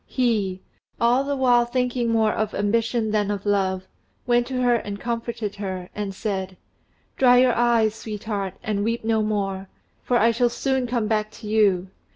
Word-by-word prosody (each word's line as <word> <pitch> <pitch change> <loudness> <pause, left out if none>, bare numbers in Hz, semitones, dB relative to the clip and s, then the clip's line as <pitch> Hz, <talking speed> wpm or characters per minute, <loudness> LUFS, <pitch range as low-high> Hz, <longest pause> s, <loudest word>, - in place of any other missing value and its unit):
He, 210 -7 0 0.4
all 240 +3 +3
the 285 0 -2
while 245 -3 +4
thinking 245 0 -1
more 220 -1 +2
of 215 -1 -2
ambition 225 +2 0
than 210 -1 +1
of 205 -1 -3
love, 190 -2 0 0.4
went 240 -1 +2
to 260 -1 -3
her 245 -1 +4
and 205 -2 -6
comforted 230 -3 -4
her, 185 -3 -5
and 205 -2 -4
said: 190 -3 -3 0.6
"Dry 250 -1 +6
your 250 -1 +5
eyes, 230 -2 +2
sweetheart, 210 -3 -5
and 205 -2 -1
weep 230 +1 -1
no 220 0 +1
more, 195 -2 -2 0.3
for 245 - +1
I 230 +1 +4
shall 240 +1 +2
soon 265 +1 -1
come 235 -2 -1
back 215 -1 0
to 215 - -10
you. 200 -4 +2
220 Hz, 175 wpm, -23 LUFS, 205-240 Hz, 0.6 s, Dry